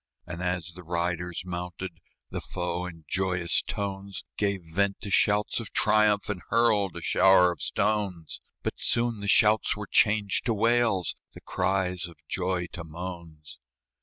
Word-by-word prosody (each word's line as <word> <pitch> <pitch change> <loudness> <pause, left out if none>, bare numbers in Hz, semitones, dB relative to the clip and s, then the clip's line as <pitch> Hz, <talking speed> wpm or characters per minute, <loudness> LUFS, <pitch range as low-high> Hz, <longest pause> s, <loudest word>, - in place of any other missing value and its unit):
And 90 0 -6
as 90 -1 0
the 90 - -9
riders 85 0 -2
mounted, 90 0 -6 0.3
The - - -4
foe, 90 0 -3
in 80 -3 -11
joyous 90 -2 +1
tones, 100 -1 -5
Gave 100 -2 0
vent 100 +5 0
to 100 - -6
shouts 105 +2 +2
of 115 - -7
triumph, 105 -1 +3
And 105 -4 -3
hurled 110 -5 +2
a - - -7
shower 95 -2 +5
of 85 - -8
stones; 100 -6 -1 0.2
But - - -3
soon 115 -2 +1
the 100 - -5
shouts 105 +1 +4
were 105 - -5
changed 105 0 +2
to 115 - +2
wails, 115 -4 +2 0.2
The - - -12
cries 90 -2 -1
of 85 - -13
joy 90 -1 -1
to 85 - -6
moans. 80 -3 -9
95 Hz, 155 wpm, -27 LUFS, 90-105 Hz, 0.3 s, shower